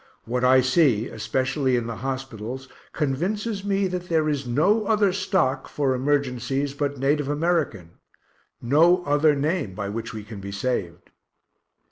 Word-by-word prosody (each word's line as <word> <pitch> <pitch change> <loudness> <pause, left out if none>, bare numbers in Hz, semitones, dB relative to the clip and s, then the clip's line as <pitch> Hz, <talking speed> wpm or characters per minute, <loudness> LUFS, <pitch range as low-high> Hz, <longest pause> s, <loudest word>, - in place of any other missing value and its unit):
What 125 +2 -2
I 130 +1 +6
see, 130 -4 +2
especially 130 +4 0
in 120 -1 -1
the 115 -1 -5
hospitals, 130 -1 -5 0.2
convinces 195 - -2
me 200 -1 +1
that 180 -1 -4
there 160 -2 +2
is 145 -4 -1
no 195 - +2
other 210 -4 +3
stock, 180 -9 0
for 140 -3 0
emergencies, 135 0 -1
but 145 0 -2
native 140 +2 +1
American 145 - -1 0.6
no 165 +8 +4
other 145 +1 +3
name 145 - -1
by 100 -1 -4
which 115 +2 -5
we 110 -1 -7
can 105 -1 -9
be 100 0 -7
saved.) 100 -5 -3
135 Hz, 145 wpm, -24 LUFS, 120-165 Hz, 0.6 s, I